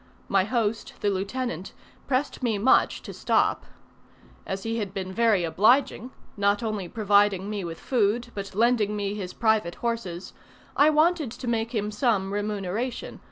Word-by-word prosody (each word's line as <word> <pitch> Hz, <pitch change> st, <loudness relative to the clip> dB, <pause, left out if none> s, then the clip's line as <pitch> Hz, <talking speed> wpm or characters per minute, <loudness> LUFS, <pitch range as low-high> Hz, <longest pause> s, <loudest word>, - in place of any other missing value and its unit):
My 195 Hz, -1 st, +2 dB
host, 225 Hz, -1 st, -1 dB
the 205 Hz, -, +2 dB
lieutenant, 195 Hz, -1 st, -3 dB, 0.3 s
pressed 275 Hz, +1 st, -1 dB
me 230 Hz, -4 st, 0 dB
much 230 Hz, +6 st, +3 dB
to -, -, -8 dB
stop. -, -, +1 dB, 0.8 s
As 195 Hz, 0 st, -4 dB
he 225 Hz, 0 st, -2 dB
had 200 Hz, -3 st, -4 dB
been 190 Hz, -1 st, -4 dB
very 225 Hz, -4 st, +3 dB
obliging 225 Hz, -, +2 dB, 0.3 s
not 205 Hz, +2 st, +1 dB
only 210 Hz, -5 st, -3 dB
providing 205 Hz, -2 st, +2 dB
me 205 Hz, -2 st, -3 dB
with 165 Hz, -1 st, -6 dB
food, 235 Hz, 0 st, 0 dB
but 195 Hz, -1 st, -6 dB
lending 220 Hz, -2 st, +2 dB
me 200 Hz, -1 st, -2 dB
his 190 Hz, -3 st, -5 dB
private 220 Hz, -6 st, +1 dB
horses 225 Hz, -7 st, -4 dB, 0.4 s
I 290 Hz, +2 st, +6 dB
wanted 310 Hz, -2 st, +2 dB
to 245 Hz, +2 st, -8 dB
make 230 Hz, 0 st, -1 dB
him 210 Hz, 0 st, -1 dB
some 210 Hz, -4 st, 0 dB
remuneration. 205 Hz, +3 st, -3 dB
210 Hz, 155 wpm, -26 LUFS, 195-235 Hz, 0.8 s, I